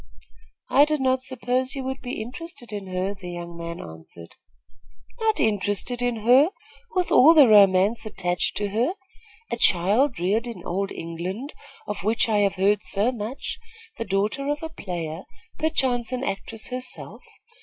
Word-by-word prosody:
"I 285 +2 +7
did 305 0 -1
not 260 -1 +2
suppose 255 +1 -2
you 270 - -4
would 265 +1 -4
be 245 -3 -4
interested 255 -1 -9
in 200 -2 -5
her," 185 +2 -2
the 185 -3 -9
young 175 -1 -7
man 170 0 -6
answered. 80 +1 -11 0.9
"Not 440 -1 +1
interested 210 +3 0
in 245 -3 -1
her, 255 +8 +6 0.5
with 365 -1 0
all 320 +6 +7
the 290 -5 +8
romance 200 +1 +5
attached 180 -5 -1
to 205 -1 -1
her. 235 - 0 0.6
A 235 - -1
child 210 +7 +3
reared 210 +7 0
in 210 -7 -7
old 195 +3 -2
England, 180 - -5 0.3
of 210 -2 -5
which 225 +4 +2
I 215 -2 +2
have 200 -1 +2
heard 200 +2 +2
so 205 +5 +1
much, 245 - -5 0.4
the - - 0
daughter 210 +8 -1
of 295 +2 -2
a 320 - -4
player, 175 - -5 0.4
perchance 260 -7 +1
an 255 0 -2
actress 220 +1 -4
herself. 255 0 -5
220 Hz, 160 wpm, -24 LUFS, 190-260 Hz, 0.9 s, the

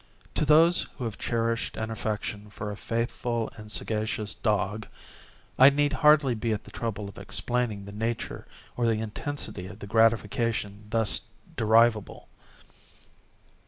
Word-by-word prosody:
To - - +1
those 165 +4 +5
who 130 - -5
have 115 -3 -4
cherished 115 -1 -1
an 110 0 -3
affection 105 -1 -4
for 105 +1 -5
a - - -5
faithful 115 +1 -2
and 105 -1 -10
sagacious 105 +1 -1
dog, 105 -1 -1 0.7
I 135 +2 +10
need 145 +1 +1
hardly 150 -4 +5
be 115 0 -1
at 105 - -4
the - - -14
trouble 105 -3 -4
of 100 - -10
explaining 105 +1 -1
the 100 - -8
nature 115 +3 -3 0.3
or 120 -1 +1
the 110 -1 +2
intensity 110 -3 -4
of 100 0 -10
the 105 - -8
gratification 110 -1 +1
thus 110 -2 +2 0.3
derivable. 110 -1 +3
110 Hz, 140 wpm, -27 LUFS, 105-120 Hz, 0.7 s, I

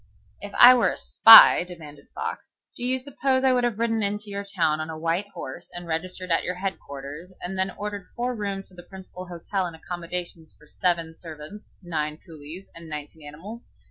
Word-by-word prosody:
"If 205 - -7
I 245 +1 +10
were 245 - +3
a - - -5
spy," 225 -5 +9
demanded 160 -5 -12
Fox, - - -5 0.3
"do 240 - -8
you 255 +1 +1
suppose 260 0 -1
I 260 -1 +4
would 250 -1 +1
have 240 -4 0
ridden 225 -1 0
into 205 0 -2
your 200 0 -4
town 170 -6 0
on 155 - -6
a 160 - -6
white 165 +5 -1
horse 130 - -8
and 175 0 -6
registered 180 +2 -4
at 165 - +2
your 180 - -3
head 190 +1 -4
quarters 140 +6 -9
and 180 +2 -5
then 190 0 +1
ordered 205 -2 -6
four 245 +1 -2
rooms 200 -4 -5
at 180 - -19
the - - -9
principal 185 -1 -10
hotel 180 +2 -3
and 170 - -9
accommodations 170 -1 -6
for - - -20
seven 165 0 -1
servants, 160 +5 -11
nine 155 -3 -3
coolies, 160 +3 -11
and 165 -1 -12
nineteen 150 0 -8
animals? 195 +11 -10
180 Hz, 200 wpm, -25 LUFS, 160-205 Hz, 0.3 s, I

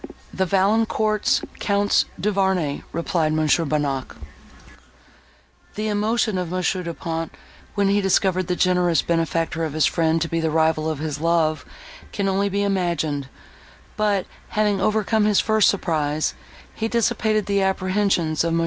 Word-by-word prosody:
"The 190 0 0
Valancourts, 215 +2 +1 0.2
Counts 205 0 +2
Duvarney," 190 -7 0
replied 165 -1 0
Mons. 155 -2 +3
Bonnac. 145 -5 -2 1.6
The 215 +1 -2
emotion 215 -1 0
of 180 -2 -3
Mons. 185 -1 0
Du 180 -3 -4
Pont, 165 0 -4 0.4
when 200 -1 +2
he 205 +1 +2
discovered 185 -1 +1
the 180 - 0
generous 180 -2 +2
benefactor 165 -1 -1
of 155 -3 -3
his 155 -2 +2
friend 165 -1 +1
to 165 - -1
be 165 0 -2
the 160 -1 0
rival 160 0 +1
of 155 - -2
his 150 0 -4
love, 165 -2 +1 0.5
can 200 -1 -2
only 195 +1 +1
be 200 +1 -1
imagined; 170 -8 -1 0.7
but, 205 -3 +1 0.2
having 210 -2 +1
overcome 215 +1 +1
his 210 -2 +3
first 220 -3 +3
surprise, 155 -5 -1 0.4
he 225 - -2
dissipated 220 -2 +1
the 200 -1 +1
apprehensions 185 -4 +1
of 165 0 0
Mons. 165 - +1
180 Hz, 145 wpm, -22 LUFS, 160-200 Hz, 1.6 s, Mons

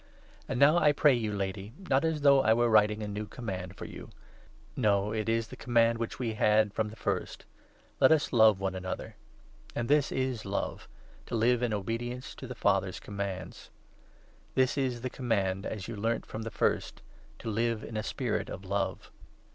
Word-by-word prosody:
And 135 -4 -2
now, 150 +5 +6
I 150 -3 +4
pray 145 -1 +5
you, 115 -3 -1
5 105 - -3
Lady 95 +2 -4
— - - -21
not 135 +2 +4
as 160 -2 0
though 140 -1 +6
I 110 -3 +4
were 120 0 +3
writing 105 0 +4
a - - -3
new 105 +1 -4
command 95 -6 -6
for - - -7
you; - - -9 0.7
no, 105 -3 +2
it 110 0 -2
is 115 0 0
the - - -8
command 115 -1 +2
which 115 - -3
we 120 -3 -2
had 105 -1 +3
from 110 -1 -1
the 110 - -11
first - - -3 0.3
— - - -33
Let 130 - +7
us 155 -3 +2
love 110 -4 +6
one 95 -1 -1
another. 95 0 -5 0.6
And 120 - -1
this 145 0 +3
is 130 -3 -1
love 100 0 -3 0.2
— - - -25
to - - -3
live 120 +2 +3
in 120 -2 0
obedience 115 +5 -3
to 130 - -9
the 125 - -7
6 - - -23
Father's 95 -1 +1
commands. 100 -2 -6 0.9
This 130 -1 +3
is 130 -4 -1
the 130 - -2
Command 100 -6 -1
as 100 -3 -5
you 115 - -5
learnt 115 +3 -1
from 110 - -6
the 115 - -4
first, - - -1 0.3
to 110 - -5
live 115 +1 0
in 115 - -8
a 110 - 0
spirit - - -2
of 95 - -7
love. 100 0 -2
115 Hz, 205 wpm, -30 LUFS, 100-125 Hz, 0.9 s, Let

